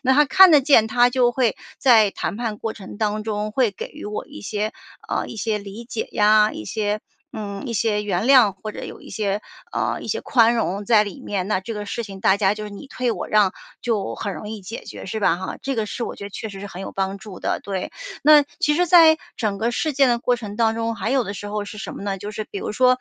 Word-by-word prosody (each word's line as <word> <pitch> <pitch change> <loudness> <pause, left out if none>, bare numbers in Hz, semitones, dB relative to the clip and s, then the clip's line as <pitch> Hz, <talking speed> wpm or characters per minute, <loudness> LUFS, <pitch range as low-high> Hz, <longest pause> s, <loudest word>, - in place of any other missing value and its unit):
那 265 0 +3
他 295 +2 +6
看 375 +7 +7
得 300 -3 +7
见， 255 -6 +5
他 245 +2 +4
就 245 -1 +3
会 245 -3 +1 0.2
在 225 -6 +5
谈 200 - -4
判 225 -3 -3
过 225 0 -4
程 200 -1 -10
当 215 0 -1
中 210 -1 -2
会 245 -2 +2
给 200 - -7
予 - - -11
我 210 - -5
一 - - -11
些 210 - -3 0.4
呃， - - -1
一 - - -8
些 215 0 -1
理 200 +3 -9
解 230 -1 -4
呀， 210 0 +5
一 105 - -7
些 210 - -2 0.3
嗯， 200 -2 -5
一 235 - -3
些 215 -1 +1
原 200 0 -1
谅， 250 -7 +6
或 215 - -5
者 - - -7
有 - - -9
一 - - -13
些 205 -1 -1 0.3
呃， - - -1
一 - - -8
些 - - -1
宽 235 -3 +4
容 205 -3 -1
在 215 0 +5
里 205 +6 -8
面。 195 -7 -3
那 210 - +1
这 225 +4 -6
个 210 0 -5
事 235 - -3
情 195 -2 -9
大 190 +1 +4
家 200 -1 +2
就 215 0 -6
是， 210 - -7
你 205 +7 -10
退 250 -2 -2
我 - - -5
让， 210 -3 +4 0.3
就 220 -5 -1
很 200 -3 -4
容 210 - -7
易 220 -1 -6
解 205 +5 -8
决， - - -9
是 220 +3 -3
吧 195 - +3
哈。 185 - -5
这 270 0 -2
个 220 -2 -1
是 235 - -4
我 - - -5
觉 200 - -8
得 200 - -7
确 220 - -6
实 195 -2 -9
是 205 - -6
很 195 -1 -8
有 - - -6
帮 195 0 -2
助 195 -2 -10
的， - - -1
对。 190 -2 -4 0.3
那 300 0 +8 0.2
其 295 - +3
实 355 +2 +2
在 320 -2 +7 0.2
整 210 -4 -1
个 230 +3 0
事 305 +5 -1
件 275 -1 +4
的 240 -1 +2
过 245 0 +1
程 210 -3 -7
当 225 -1 +2
中， 230 0 -2
还 225 - -3
有 265 -3 +2
的 200 - -4
时 205 - -7
候 210 0 -3
是 210 +1 -9
什 - - -6
么 - - -8
呢？ 195 -1 -2
就 205 +2 -6
是 215 0 -5
比 200 - -4
如 - - -4
说， 255 +3 +4
215 Hz, 290 characters per minute, -22 LUFS, 205-240 Hz, 0.4 s, 那